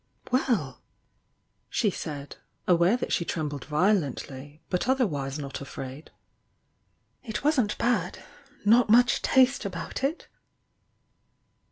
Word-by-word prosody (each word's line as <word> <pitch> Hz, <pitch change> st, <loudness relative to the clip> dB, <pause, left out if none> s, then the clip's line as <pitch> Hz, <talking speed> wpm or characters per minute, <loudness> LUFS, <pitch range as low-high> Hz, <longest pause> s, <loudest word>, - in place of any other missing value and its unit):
"Well!" 255 Hz, -2 st, 0 dB, 0.9 s
she 210 Hz, -5 st, +1 dB
said, 145 Hz, -5 st, -6 dB, 0.3 s
aware 180 Hz, +5 st, +4 dB
that -, -, -3 dB
she -, -, +1 dB
trembled 150 Hz, -5 st, -3 dB
violent 155 Hz, -1 st, +1 dB
ly, 145 Hz, +3 st, -11 dB
but 180 Hz, +7 st, -1 dB
otherwise 155 Hz, -, 0 dB
rot 140 Hz, -1 st, -6 dB
afraid: 135 Hz, +1 st, -8 dB, 1.1 s
"It 220 Hz, +1 st, -4 dB
wasn't 265 Hz, -8 st, +2 dB
bad! 245 Hz, 0 st, 0 dB, 0.5 s
Not 230 Hz, +2 st, +5 dB
much 245 Hz, +2 st, +5 dB
taste 265 Hz, +1 st, +3 dB
about 185 Hz, +4 st, -5 dB
it! 295 Hz, +5 st, -1 dB
185 Hz, 110 wpm, -27 LUFS, 145-245 Hz, 1.1 s, Not